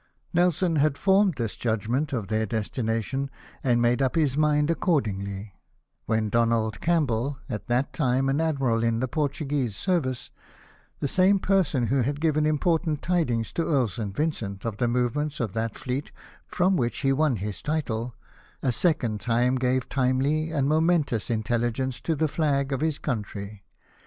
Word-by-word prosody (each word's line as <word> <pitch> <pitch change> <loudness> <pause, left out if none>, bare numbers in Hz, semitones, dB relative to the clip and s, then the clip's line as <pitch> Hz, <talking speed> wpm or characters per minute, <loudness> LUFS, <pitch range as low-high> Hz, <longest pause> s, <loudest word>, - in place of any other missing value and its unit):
Nelson 175 -1 +2
had 145 -1 +2
formed 195 -3 +3
his 115 -3 -2
judgment 120 +6 -1
of 115 -7 -2
their 110 +2 0
destina 110 +1 -1
tion, 135 +4 -3 0.3
and 120 -2 +3
made 120 +2 +2
up 135 +3 +1
his 150 -5 +2
mind 150 0 +3
accordingly, 100 - -1 0.5
when 110 -1 +1
Donald 115 -1 +1
Campbell, 140 -6 +1
at 110 -5 -5
that 120 +3 0
time 130 -2 +1
an 140 +3 +1
Admiral 135 -8 +1
in 115 -1 +1
the 130 - 0
Portuguese 140 -4 -1
service, 130 - -1 0.7
the - - +1
same 190 +6 +4
person 185 -10 +1
who 130 +4 +2
had 140 +4 -1
given 155 -1 +2
important 155 0 +1
tidings 135 -11 0
to 165 - 0
Earl 135 -8 +2
St. 100 -1 -5
Vincent 115 -11 -2
of 110 -3 -3
the 120 - +1
movements 125 +5 -1
of 110 -6 -2
that 115 -1 -2
fleet 130 +3 -4 0.4
from 185 +2 +2
which 120 -6 -1
he 135 -2 +3
won 145 -2 +2
his 105 0 -5
title, 125 -6 -2 0.5
a 130 - +2
second 125 - 0
time 125 +2 +2
gave 125 0 0
timely 135 +4 +1
and 140 -4 0
momentous 155 -6 +1
intelligence 120 +3 -1
to 165 - 0
the 155 +2 +1
flag 140 -3 0
of 135 - -2
his 155 -2 0
country. 105 -5 -5
130 Hz, 160 wpm, -26 LUFS, 115-155 Hz, 0.7 s, same